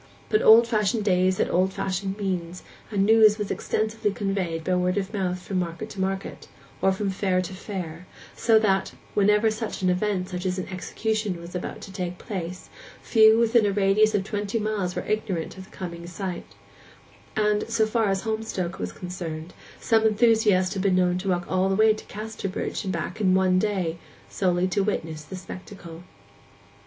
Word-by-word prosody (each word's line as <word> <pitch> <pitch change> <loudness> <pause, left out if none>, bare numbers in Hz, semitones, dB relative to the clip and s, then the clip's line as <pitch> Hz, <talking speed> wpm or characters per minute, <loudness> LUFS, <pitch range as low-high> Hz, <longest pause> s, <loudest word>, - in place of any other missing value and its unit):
But 430 - +3
old 230 +2 +8
fashioned 215 -1 +1
days 185 -1 +3
had - - 0
old 185 +2 +2
fashioned 195 +1 -2
means, 180 -3 -3 0.3
and 200 -2 +1
news 220 -1 +6
was 210 -2 -3
extensively 215 -1 -1
conveyed 195 -6 -2
by 185 - 0
word 180 +1 +1
of 200 +1 -2
mouth 185 -3 -1
from 185 +1 -3
market 175 +5 -4
to 190 - -5
market, 190 0 -3 0.3
or 190 - +4
from 195 +1 -1
fair 190 -1 0
to 185 +1 -4
fair, 180 -3 -6 0.3
so 225 -2 +4
that, 195 -3 +1 0.2
whenever 210 +2 +3
such 215 -3 -4
an 185 - +4
event 185 -1 -1
as 180 +1 -2
an 185 - -4
execution 210 +1 -2
was 170 +1 -10
about 180 - -5
to 195 - -9
take 180 -2 -4
place, 180 -3 -6 0.4
few 220 -1 +6
within 230 0 +4
a - - +1
radius 205 +2 +3
of 195 - +1
twenty 205 +1 -2
miles 210 -4 -2
were - - -3
ignorant 200 -6 -2
of 190 - -9
the - - -18
coming 170 -2 -6
sight; 175 - -6 0.8
and, 210 0 +1
so 230 -1 +2
far 220 0 +1
as 195 0 0
Holmstoke 220 -5 -3
was 90 0 -3
concerned, 170 - -6 0.3
some 225 -1 +3
enthusiasts 215 -4 +3
had 195 - -2
been 190 -1 +2
known 180 0 +2
to 195 +1 -3
walk 175 -1 0
all 185 +1 +1
the 195 - +1
way 220 +1 +5
to 215 - -10
Casterbridge 210 -2 -4
and 190 - -1
back 185 +5 -4
in 185 -2 +4
one 185 -1 +3
day, 185 -5 -1 0.3
solely 180 -1 +1
to 200 - +1
witness 160 -6 -2
the 190 - -8
spectacle. 185 -2 -9
195 Hz, 185 wpm, -25 LUFS, 180-215 Hz, 0.8 s, old